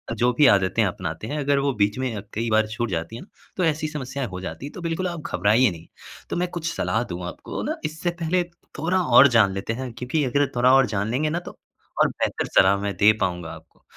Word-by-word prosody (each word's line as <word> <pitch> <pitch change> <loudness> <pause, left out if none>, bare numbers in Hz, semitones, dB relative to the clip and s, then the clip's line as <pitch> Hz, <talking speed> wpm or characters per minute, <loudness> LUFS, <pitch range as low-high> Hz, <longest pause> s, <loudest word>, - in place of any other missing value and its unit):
जो 120 +3 +2
भी 145 +4 +4
आदतें 100 +3 +3
अपनाते 90 +1 -4
हैं 150 +3 -3
अगर 140 0 +2
वो 140 -1 0
बीच 105 0 +1
में 125 -4 -2
अ, 100 - -4
कई 115 +2 -2
बार 110 0 +3
छूट 115 +1 -3
जाती 85 +6 -3
है - - -8
ना 195 - -13 0.3
तो 180 - +1
ऐसी 155 -1 0
समस्याएँ 135 -3 -4
हो 90 0 -6
जाती 125 - -6
है 145 - -7
तो 180 - -7
बिल्कुल 170 +2 -2
आप 170 -3 -5
घबराइए 105 +5 +3
नहीं। 85 0 -11 0.4
तो - - -2
मैं 180 +1 0
कुछ 165 -2 -3
सलाह 110 +2 0
दूँ 90 0 -5
आपको - - -6
ना - - -2
इससे 160 +3 -2
पहले 175 +2 +1 0.4
थोड़ा 180 +4 +1 0.2
और 140 - +10
जान 100 -3 +4
लेते 100 +4 -3
हैं 130 0 -5
क्योंकि 130 +6 -2
अगर 140 +3 +1
थोड़ा 125 +2 +4
और 135 -1 +6
जान 105 +1 -2
लेंगे 150 +5 0
ना 170 - -1
तो - - -10 0.4
और - - +6
बेहतर - - -2
सलाह 100 +1 +4
मैं 100 -1 -2
दे 105 +1 +6
पाऊँगा 90 -2 -2
आपको। 80 -1 -16
125 Hz, 240 wpm, -23 LUFS, 100-150 Hz, 0.4 s, और